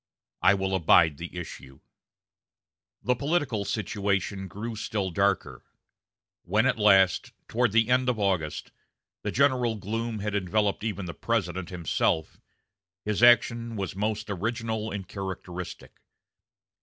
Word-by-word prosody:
I 95 - +6
will 95 0 -2
abide 80 -4 +4
the 85 +2 -7
issue." 70 -6 -8 1.2
The 125 - +2
political 140 -7 0
situation 100 -2 -1
grew 110 +5 -6
still 105 -3 -2
darker. 100 +2 0 0.8
When 105 +6 +1
at 125 -4 +1
last, 95 -4 +4
toward 120 -1 +1
the 115 +1 +3
end 125 0 +3
of 125 - 0
August, 95 -7 -1 0.5
the - - -3
general 130 -4 +2
gloom 110 +3 -3
had 105 0 -3
enveloped 100 +1 0
even 100 -4 -3
the 85 - -5
President 95 -4 -2
himself, 85 -3 -1 0.6
his 105 0 -1
action 120 -1 +4
was 95 -3 -4
most 105 +2 -2
original 110 +2 -2
and 100 -3 -5
characteristic. 90 -3 -7
105 Hz, 125 wpm, -27 LUFS, 95-115 Hz, 1.2 s, I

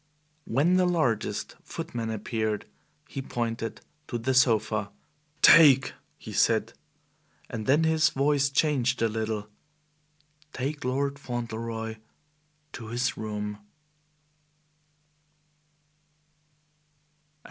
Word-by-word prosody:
When 155 +10 +2
the 180 -1 +3
largest 130 -12 -1
footman 115 -2 -5
appeared, 110 -1 -2 0.4
he 135 - -5
pointed 115 -4 -4 0.3
to 120 - -3
the 125 +3 -1
sofa. 110 -5 +2 0.5
"Take" 140 -5 +7 0.2
he - - -9
said, - - +2 0.8
and 110 -2 -5
then 145 +4 +4
his 160 0 +3
voice 140 0 +2
changed 135 -4 +1
a - - +4
little 110 -1 -3 1.1
"take 145 +4 -3
Lord 140 +2 -1
Fauntleroy 115 -3 -4 0.8
to 115 - -8
his 120 +2 -1
room." 105 -1 -5
120 Hz, 90 wpm, -27 LUFS, 110-140 Hz, 1.1 s, Take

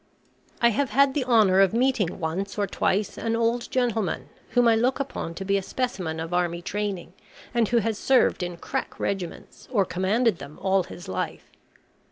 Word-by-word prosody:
I 235 - +7
have 260 +4 0
had 270 +4 +4
the 270 -3 -1
honour 215 -6 +5
of 195 +2 +4
meeting 240 -8 +1
once 185 +5 -3
or 205 - +1
twice 200 +1 -1
an 230 0 -1
old 230 +1 0
gentleman, 220 - -1 0.2
whom 245 -1 +3
I 230 - +5
look 250 +4 +1
upon 260 -11 -4
to 195 - -5
be 200 +1 +2
a - - -1
specimen 185 -8 -3
of 165 +2 -5
army 175 -1 0
training, 200 -3 -3 0.4
and 235 -2 +2
who 240 - +2
has 225 -1 0
served 260 -6 +3
in 175 -1 -4
crack - - -4
regiments, 190 -4 -4
or 205 -6 +3
commanded 190 +4 +1
them, 150 - -10
all 190 -1 +2
his 175 - -10
life. 95 - -4
205 Hz, 185 wpm, -25 LUFS, 180-235 Hz, 0.4 s, I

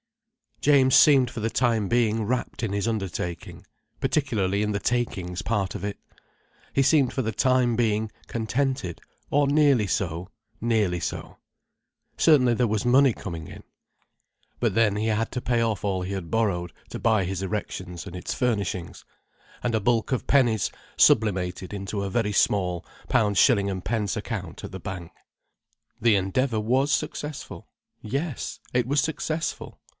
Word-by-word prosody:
James 135 -3 +5
seemed 135 -5 +6
for 120 - -7
the 110 +1 -1
time 115 -4 +1
being 115 0 +2
wrapt 120 +3 -2
in 115 -4 -1
his 100 +2 -1
undertaking—particularly 100 - -3
in 105 0 0
the 100 - -1
takings 95 -7 -2
part 100 -4 -1
of - - -6
it. 100 0 -3 0.8
He 135 - +3
seemed 135 -2 +3
for 130 - -1
the 110 - -1
time 125 +1 +2
being 110 -2 0 0.2
contented—or 130 - -2
nearly 140 -7 +4
so, 90 -2 -2 0.3
nearly 105 -6 +1
so. - - -5 0.8
Certainly 125 -7 +5
there 125 +1 +2
was 110 0 -1
money 130 +1 +5
coming 85 -7 -7
in. - - -11 1.0
But - - 0
then 110 -3 +3
he 110 +2 -1
had 110 +1 0
to 125 - -2
pay 120 -1 +1
off 110 -4 -1
all 95 -2 -1
he 95 +2 -4
had 95 -4 -5
borrowed 90 -7 0 0.2
to - - -6
buy 110 -3 +2
his 95 0 -3
erection 95 -3 -4
and 95 -3 -8
its 90 - -4
furnishings, 100 -8 -2 0.6
and 120 - 0
a 110 - +2
bulk 115 +3 +1
of 130 - -1
pennies 120 -8 +3 0.3
sublimated 95 -3 +2
into 100 0 -3
a 100 - -2
very 105 +1 0
small 90 -3 +1 0.2
£.s.d. 100 -1 +2
account, - - -6
at - - -6
the - - -7
bank. 90 -3 -7 0.9
The 115 -2 +4
Endeavour 110 +5 0
was 130 +7 +1
successful—yes, 145 -1 -4
it 125 -1 +1
was 140 +1 +2
successful. 160 +1 -3
110 Hz, 145 wpm, -25 LUFS, 95-125 Hz, 1.0 s, seemed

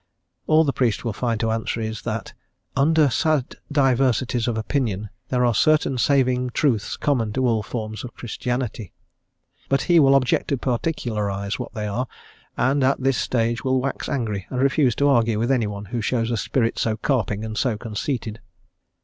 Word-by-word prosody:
All 155 +1 +5
the 140 -3 0
priest 120 -2 0
will 115 - -1
find 115 0 -1
to 115 - +1
answer 115 +1 -2
is, 110 -1 -4
that - - -4 0.4
"under 155 +2 +4
sad 155 -1 0
diversities 130 -3 +2
of 115 -2 -1
opinion 110 -3 -2 0.2
there 125 -1 +2
are 120 - +3
certain 135 +2 +2
saving 125 -2 +2
truths 120 -8 +1
common 115 -7 0
to 130 +2 0
all 115 -3 +2
forms 110 -1 -5
of 125 - -9
Christianity," 120 -3 -4 0.8
but 135 - +2
he 175 -2 +5
will 135 -2 +6
object 130 -2 +2
to 140 - 0
particularise 110 -7 -2
what - - -6
they 105 -1 -3
are, 115 +5 -2 0.5
and 135 +3 +2
at 135 +1 +2
this 135 -1 +1
stage 115 -1 0
will 130 0 +2
wax 135 +2 -3
angry 105 -7 -2
and 125 - -3
refuse 135 -2 +3
to 145 - +2
argue 115 -5 +3
with 120 +4 0
anyone 105 -5 -1
who 120 +3 -3
shows 115 +1 0
a 120 - 0
spirit 115 +1 0
so 110 -1 0
carping 110 -4 -1
and 110 -1 -5
so 120 -5 0
conceited. 115 +1 -4
120 Hz, 175 wpm, -23 LUFS, 110-135 Hz, 0.8 s, will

